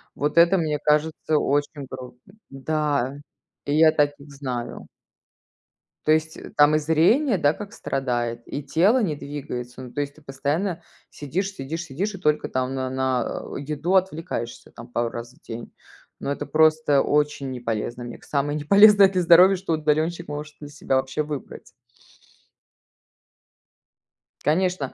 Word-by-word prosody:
Вот 150 +3 -2
это, 170 +3 +6
мне 155 -4 -1
кажется, 150 +1 +1
очень 145 0 -1
грустно. 125 +7 -11 0.2
Да, 140 -1 -1 0.5
и 145 - -1
я 160 0 +6
таких 145 -1 -1
знаю. 130 -4 -6 1.2
То 155 - +3
есть 160 0 +1 0.2
там 145 +1 +6
и - - +3
зрение, 180 - +3
да, 145 -1 +3
как 210 +1 -9
страдает, 120 - -2
и 145 - -5
тело 195 - +3
не 155 -6 -1
двигается. 130 -4 -7
Ну, 125 - -10
то 145 - -1
есть 140 0 -5
ты 155 - -18
постоянно 150 +7 -2 0.3
сидишь 185 +8 -3
сидишь 160 +3 -5
сидишь 190 +8 -3
и - - -7
только 150 -4 0
там 130 0 -2
на 130 -1 -2
на 130 -2 -1 0.2
еду 150 +6 -2
отвлекаешься, 165 -9 -2
там 115 +1 -11
пару 120 -1 -1
раз 120 +1 -8
в 155 - -26
день. 115 +1 -8 0.5
Но 140 - -3
это 145 +1 -3
просто 155 -2 +3
очень 145 -2 0
неполезно. 120 0 -4
Мне 120 0 -8
к - - -22
самое 145 +1 -1
неполезное 200 +5 +7
для 185 -2 0
здоровья, 180 +3 +7
что 180 -3 -3
удаленщик 155 +3 0
может 150 +1 -6
для 145 - -9
себя 135 -2 -1
вообще 130 +3 -1
выбрать. 150 -2 -7 2.8
Конечно. 175 -2 0
150 Hz, 150 wpm, -24 LUFS, 135-165 Hz, 2.8 s, неполезное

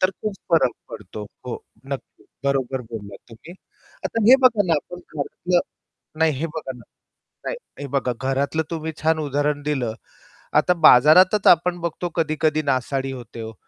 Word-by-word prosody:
तर 185 - +3
खूप 210 +2 -5 0.2
फरक 160 -7 +4 0.2
पडतो. 105 -1 -8 0.2
हो. 125 - -5 0.2
नक्की. 135 -1 -7 0.2
बरोबर 135 -1 0
बोललात 100 -3 -8
तुम्ही. 115 +9 -13 0.5
आता 230 - -1
हे 260 - +10
बघा 225 -5 +5
ना 170 - +2
आपण 175 +4 -4
घरातलं 175 +4 -1 0.6
नाही 160 -1 +3
हे 160 - 0
बघा 155 -4 -6
ना, 120 - -14 0.6
नाही - - -3 0.2
हे 145 - -4
बघा 130 -2 +1
घरातलं 140 +4 0
तुम्ही 160 -1 -4
छान 160 0 +2
उदाहरण 145 0 -1
दिलं. 135 -6 -1 0.6
आता 180 - +4
बाजारातच 180 - +7
आपण 175 +1 +5
बघतो 170 +1 -3
कधी-कधी 155 -1 +1
नासाडी 135 +1 -1
होते 120 -3 -9
हो. 110 0 -7
150 Hz, 155 wpm, -22 LUFS, 130-170 Hz, 0.6 s, हे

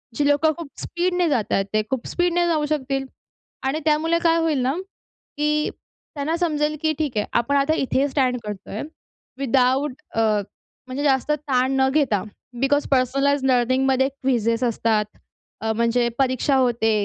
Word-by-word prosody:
जी 290 +2 +1
लोकं 290 +2 +3
खूप 335 -4 -6
स्पीडने 355 0 0
जात 245 -8 0
आहेत, 195 - +2
ते 215 - +3
खूप 265 -3 -3
स्पीडने 350 0 +1
जाऊ 310 -3 +1
शकतील 275 -2 -2 0.6
आणि 295 +4 0
त्यामुळे 320 +2 +2
काय 330 -1 +4
होईल 315 -4 +1
ना, 255 +2 +1 0.6
की 300 0 +1 0.5
त्यांना 300 +3 -1
समजेल 305 -3 0
की 315 - +2
ठीक 280 -8 -2
आहे, 210 - +1
आपण 235 +4 +1
आता 280 +2 +3
इथे 270 +1 +1
स्टँड 260 -2 +1
करतोय 210 0 -6 0.6
विदाऊट 265 +1 +2 0.2
अ, - - +1 0.7
म्हणजे 265 +3 -4
जास्त 270 +1 +2
ताण 265 -3 +1
न 265 - +4
घेता, 270 -10 +2 0.4
बिकॉज 285 +2 +2
पर्सनलाइज्ड 275 +1 +2
लर्निंगमध्ये 260 +2 +2
क्विजेस 245 -4 0
असतात. 225 -2 +1 0.6
अ, 220 0 0
म्हणजे 235 +1 +1
परीक्षा 265 +1 +2
होते 240 -4 +2
270 Hz, 150 wpm, -22 LUFS, 250-300 Hz, 0.7 s, काय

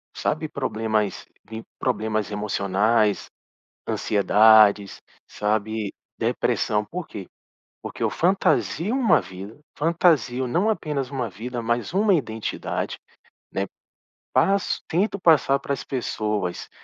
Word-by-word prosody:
sabe, - - -1
problemas 110 -2 -2 0.2
vim, 110 0 -7 0.2
problemas 110 -4 -1
emocionais, 105 +1 +1 0.6
ansiedades, 105 0 +4 0.3
sabe, 105 0 -2 0.3
depressão. 105 0 0
Por 175 - -6
quê? 95 -4 -8 0.6
Porque - - -8
eu - - +2
fantasio 190 +1 +1
uma 255 -4 +4
vida, 95 +4 -10 0.2
fantasio 155 -6 +2
não 175 - +1
apenas 150 -10 -2
uma 130 -5 -3
vida, 120 +5 -6
mas 120 +5 -1
uma 200 +1 +3
identidade, 115 - -3 0.6
né. - - -1 0.7
Passo 195 0 +2
tento 200 +4 0
passar 145 -5 +4
para 140 - -3
as - - -5
pessoas 105 -7 -3
115 Hz, 105 wpm, -24 LUFS, 105-155 Hz, 0.7 s, ansiedades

